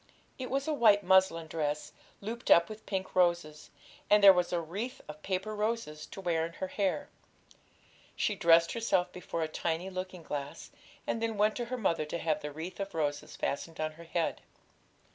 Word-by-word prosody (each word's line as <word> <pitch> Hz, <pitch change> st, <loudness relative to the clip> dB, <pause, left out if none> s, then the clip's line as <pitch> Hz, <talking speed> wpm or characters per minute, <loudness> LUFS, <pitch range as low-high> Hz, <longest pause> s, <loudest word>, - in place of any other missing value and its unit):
It 255 Hz, -, -4 dB
was 275 Hz, +2 st, -1 dB
a 310 Hz, -, +1 dB
white 215 Hz, -7 st, +5 dB
muslin 190 Hz, -3 st, +4 dB
dress, 150 Hz, -1 st, -3 dB, 0.3 s
looped 230 Hz, +4 st, -5 dB
up 170 Hz, 0 st, +6 dB
with 215 Hz, 0 st, -10 dB
pink 190 Hz, -2 st, -3 dB
roses, 170 Hz, -4 st, +1 dB, 0.4 s
and 210 Hz, 0 st, +5 dB
there 195 Hz, -1 st, +11 dB
was 180 Hz, -1 st, 0 dB
a 175 Hz, -, +1 dB
wreath 195 Hz, +10 st, -5 dB
of 150 Hz, 0 st, -9 dB
paper 190 Hz, +4 st, -2 dB
roses 210 Hz, -8 st, -2 dB
to -, -, -10 dB
wear 170 Hz, -4 st, 0 dB
in 165 Hz, +1 st, -4 dB
her 185 Hz, +2 st, -5 dB
hair. 185 Hz, -7 st, -1 dB, 1.1 s
She -, -, +1 dB
dressed 165 Hz, 0 st, +5 dB
herself 225 Hz, -6 st, +1 dB
before 170 Hz, -2 st, -4 dB
a -, -, -1 dB
tiny 170 Hz, +3 st, -2 dB
looking 185 Hz, -1 st, -6 dB
glass, 145 Hz, -2 st, -6 dB, 0.3 s
and 225 Hz, -, -2 dB
then 225 Hz, -2 st, -1 dB
went 210 Hz, +1 st, +3 dB
to 240 Hz, -, -2 dB
her 255 Hz, +2 st, -4 dB
mother 170 Hz, -8 st, 0 dB
to 150 Hz, -, -4 dB
have 160 Hz, -2 st, -1 dB
the 150 Hz, -, -5 dB
wreath 165 Hz, +6 st, -7 dB
of 195 Hz, -2 st, -4 dB
roses 145 Hz, -2 st, -2 dB
fastened 160 Hz, +3 st, -3 dB
on 155 Hz, 0 st, -1 dB
her 165 Hz, +2 st, -13 dB
head. 165 Hz, 0 st, -1 dB
180 Hz, 190 wpm, -31 LUFS, 160-210 Hz, 1.1 s, there